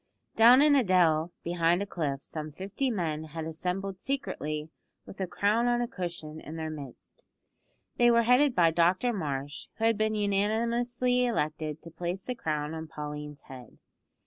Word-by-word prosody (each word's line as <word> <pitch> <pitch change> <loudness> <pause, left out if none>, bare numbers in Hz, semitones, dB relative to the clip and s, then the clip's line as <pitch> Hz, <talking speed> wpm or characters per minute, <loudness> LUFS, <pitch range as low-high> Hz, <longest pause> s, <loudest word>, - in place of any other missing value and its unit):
Down 245 +5 +8
in 300 -1 +5
a 270 - +4
dell 170 -4 +3
behind 170 +2 +1
a - - -4
cliff 145 -8 -3
some 155 -1 -6
fifty 195 - -3
men 165 -8 -2
had 160 +1 -6
assembled 185 +4 -3
secretly 155 - -3 0.3
with - - -11
the 190 - -2
crown 215 +6 +1
on 240 0 +2
a 240 - 0
cushion 170 -7 -6
in 155 - -8
their 160 -1 -4
midst. 140 -5 -10 0.7
They 240 0 +5
were 235 0 +5
headed 250 +3 +4
by 170 -2 +5
Dr 180 +8 +2
Marsh, 145 -6 -4
who 225 - -6
had 225 -2 +3
been 215 0 +1
unanimously 235 +5 +1
elected 155 -7 -2
to 165 - -10
place 180 +3 -4
the 250 - -3
crown 150 -8 -3
on 160 0 -6
Pauline's 150 -1 -7
head. 125 -3 -12
180 Hz, 170 wpm, -29 LUFS, 155-230 Hz, 0.7 s, Down